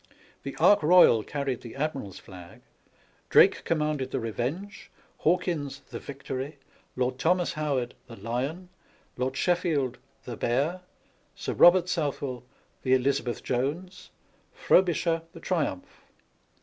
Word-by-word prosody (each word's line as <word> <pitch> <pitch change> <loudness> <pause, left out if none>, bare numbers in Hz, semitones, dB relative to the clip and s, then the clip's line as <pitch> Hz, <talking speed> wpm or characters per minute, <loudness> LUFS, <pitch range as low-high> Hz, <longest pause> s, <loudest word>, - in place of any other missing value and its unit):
The - - -6
Ark 205 - +5
Royal 155 -8 +6
carried 140 +1 -3
the 115 - -10
admiral's 135 - -3
flag; 90 -2 -13 0.7
Drake - - +5
commanded 150 -4 -1
the 135 - -2
Revenge, 125 - -4 0.3
Hawkins 155 -5 0
the - - -5
Victory, 140 +1 -6 0.4
Lord 125 0 -1
Thomas 175 +3 +1
Howard 140 -6 -2
the 115 - -10
Lyon, 130 - -4 0.5
Lord 130 +1 -2
Sheffield 160 -8 0 0.2
the 120 - -6
Bear, 140 +12 0 0.5
Sir - - -4
Bobert 175 0 +6
Southwell 145 -7 -2 0.4
the 130 -1 +3
Elizabeth 130 -2 -1
Jones, 155 +9 -3 0.4
Frobisher 170 -2 +2
the - - -10
Triumph. 155 - -3
140 Hz, 115 wpm, -27 LUFS, 125-170 Hz, 0.7 s, Royal